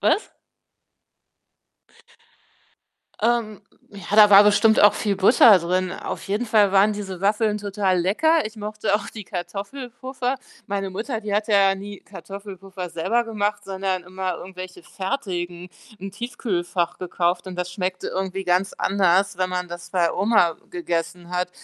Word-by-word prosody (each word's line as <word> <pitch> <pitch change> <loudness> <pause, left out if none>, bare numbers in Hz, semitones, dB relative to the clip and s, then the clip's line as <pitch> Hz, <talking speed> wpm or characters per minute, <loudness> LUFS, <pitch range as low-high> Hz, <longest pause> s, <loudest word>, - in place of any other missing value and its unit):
was? 435 - +1 2.9
Ähm, 225 -3 0 0.3
ja, 200 +1 -5
da 210 -1 +8
war 200 +1 +9
bestimmt 215 +2 +4
auch 205 - +7
viel 200 -2 -1
Butter 205 0 +7
drin. 185 +2 -1
Auf - - -6
jeden 210 +5 -1
Fall 210 -3 +3
waren 200 +2 +5
diese 195 -3 -6
Waffeln 210 +1 +1
total 200 -2 0
lecker. 300 - +2
Ich 220 +1 -10
mochte 210 0 -2
auch 205 -1 -1
die 215 -3 -9
Kartoffelpuffer. 245 +8 -5 0.3
Meine 195 -1 -3
Mutter, 225 +4 -4
die 210 -2 -3
hatte 210 +1 0
ja 195 -1 +5
nie 200 +1 -9
Kartoffelpuffer 195 -2 -9
selber 230 +9 0
gemacht, 205 -2 -2
sondern 190 -2 -3
immer 185 0 -4
irgendwelche 185 - -9
fertigen 185 - -4 0.3
im 195 0 -7
Tiefkühlfach 180 -6 -3
gekauft 180 0 -1
und 185 -1 -7
das 180 0 -3
schmeckte 185 0 -3
irgendwie 190 0 -3
ganz 180 +2 +1
anders, 195 0 +2
wenn 185 0 0
man 180 -1 -3
das 175 0 -9
bei 175 -3 +2
Oma 195 -4 +3 0.2
gegessen 175 - -3
hat 180 0 -1
195 Hz, 145 wpm, -23 LUFS, 185-210 Hz, 2.9 s, war